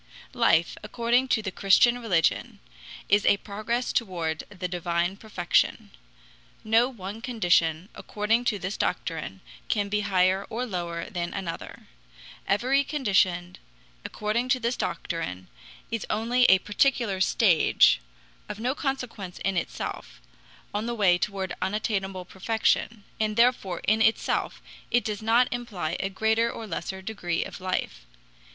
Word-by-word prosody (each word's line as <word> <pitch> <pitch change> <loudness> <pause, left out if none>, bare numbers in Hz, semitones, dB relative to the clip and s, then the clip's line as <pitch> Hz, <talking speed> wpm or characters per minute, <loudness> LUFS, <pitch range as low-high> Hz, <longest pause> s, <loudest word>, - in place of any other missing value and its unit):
Life, 230 -9 +3
according 235 +4 +1
to 220 -4 +1
the 190 - -3
Christian 240 +6 +4
religion, 180 -9 +1 0.5
is 205 +1 +4
a 200 - +4
progress 215 +5 -3
toward 170 -8 -1
the 185 -3 -5
divine 175 +1 -1
perfection. 200 -5 0 0.7
No 225 +3 +3
one 210 -2 -8
condition, 175 -8 +1
according 220 +3 -1
to 215 - +1
this 190 +2 -4
doctrine, - - -3 0.3
can 205 -2 0
be 210 +1 +1
higher 190 -1 +2
or 245 +3 -2
lower 170 -5 -4
than 175 -1 -4
another. 185 -4 -6 0.6
Every 255 +7 +2
condition, 190 - 0 0.4
according 215 +4 -2
to 255 - +3
this 235 +1 -1
doctrine, 90 - -4 0.4
is 230 -2 -3
only 235 +3 +2
a 190 - +7
particular 205 -1 +1
stage, 185 - +4 0.5
of 205 - -6
no 250 +3 0
consequence 250 -10 -4
in 195 -1 +1
itself, 175 - -4 0.5
on 210 +3 -2
the 240 - -2
way 185 -5 +4
toward 190 -1 -2
unattainable 195 -3 -2
perfection, 220 +2 0 0.2
and 215 -1 0
therefore 230 -7 +2
in 220 +1 +2
itself 220 0 +1 0.3
it 240 - +2
does 210 -1 -3
not 230 +3 +4
imply 200 -10 -3
a 195 - -1
greater 220 +4 +1
or 225 - -7
lesser 190 -2 -5
degree 185 -5 -2
of - - -9
life. 180 - -3
205 Hz, 135 wpm, -26 LUFS, 185-230 Hz, 0.7 s, a